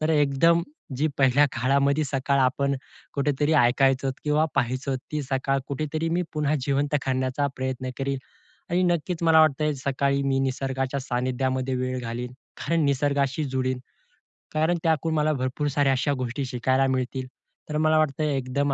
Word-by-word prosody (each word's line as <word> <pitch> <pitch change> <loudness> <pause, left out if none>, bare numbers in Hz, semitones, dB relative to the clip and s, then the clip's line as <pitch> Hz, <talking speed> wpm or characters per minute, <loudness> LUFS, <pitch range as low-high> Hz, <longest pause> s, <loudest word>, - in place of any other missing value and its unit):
तर 155 - 0
एकदम 155 +3 +3 0.3
जी 150 +4 +1
पहिल्या 135 +2 +5
काळामध्ये 140 +4 +2
सकाळ 135 0 0
आपण 140 +2 +1 0.4
कुठेतरी 145 +2 +1
ऐकायचो 135 0 +3
किंवा 150 +1 +2
पाहायचो, 130 +2 0
ती 150 +4 -5
सकाळ 135 0 0
कुठेतरी 155 +3 -2
मी 175 +2 +1
पुन्हा 150 -1 0
जिवंत 140 +2 0
करण्याचा 130 +2 0
प्रयत्न 130 0 -3
करील. 135 0 -1 0.5
आणि 175 +2 +2
नक्कीच 175 0 0
मला 160 -1 +6
वाटतं 150 0 +2
सकाळी 140 0 +1
मी 135 -1 +1
निसर्गाच्या 135 0 -1
सान्निध्यामध्ये 130 +1 -1
वेळ 130 0 -2
घालीन, 120 +1 -5 0.2
कारण 165 -2 0
निसर्गाशी 140 +1 +1
जुळीन, 130 -1 -1 0.7
कारण 160 +3 +2
त्याकडून 160 0 +1
मला 155 0 +2
भरपूर 130 +2 -2
साऱ्या 140 -1 +2
अशा 140 +2 +1
गोष्टी 130 +3 -3
शिकायला 130 +2 +1
मिळतील. 130 0 -2 0.4
तर 150 - -1
मला 155 0 +3
वाटतं 155 -1 +1
एकदम 140 0 0
140 Hz, 145 wpm, -25 LUFS, 130-150 Hz, 0.7 s, मला